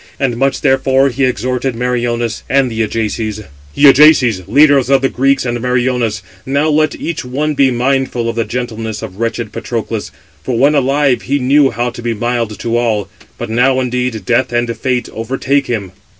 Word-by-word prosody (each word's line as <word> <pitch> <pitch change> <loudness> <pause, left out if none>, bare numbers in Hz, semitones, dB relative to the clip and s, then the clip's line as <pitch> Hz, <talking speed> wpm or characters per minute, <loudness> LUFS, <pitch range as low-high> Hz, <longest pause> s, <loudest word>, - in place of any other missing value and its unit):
And 130 -4 0
much, 135 +3 0
therefore, 135 0 +2
he 135 +2 0
exhorted 125 +1 -2
Meriones 120 -2 -2
and 135 -2 +2
the 110 0 -2
Ajaces: 110 0 -2 0.3
"Ye 145 - +3
Ajaces, 135 -7 +5
leaders 140 +2 +4
of 135 -1 +3
the 135 - +2
Greeks, 135 +1 +1
and 120 -1 -2
Meriones, 125 -4 -1 0.2
now 140 +3 0
let 155 +1 +1
each 170 -2 -4
one 145 +5 -2
be 140 -2 +3
mindful 125 -1 -1
of 115 - -3
the 115 - 0
gentleness 115 -3 -5
of 95 - -8
wretched 115 -1 -3
Patroclus; - - -4 0.3
for 125 -3 -2
when 140 +5 +4
alive, 140 -1 +1
he 140 +2 -1
knew 140 +1 +3
how 120 0 -2
to 120 - -9
be 120 -1 -2
mild 115 -1 -2
to 115 +3 -2
all; 110 -4 -1 0.3
but - - -5
now, 130 +3 +2
indeed, 125 -4 -2
Death 130 +4 +1
and 120 -1 -1
Fate 125 -2 -2
overtake 135 +4 -1
him." 105 -6 -3
125 Hz, 180 wpm, -14 LUFS, 115-135 Hz, 0.3 s, Ajaces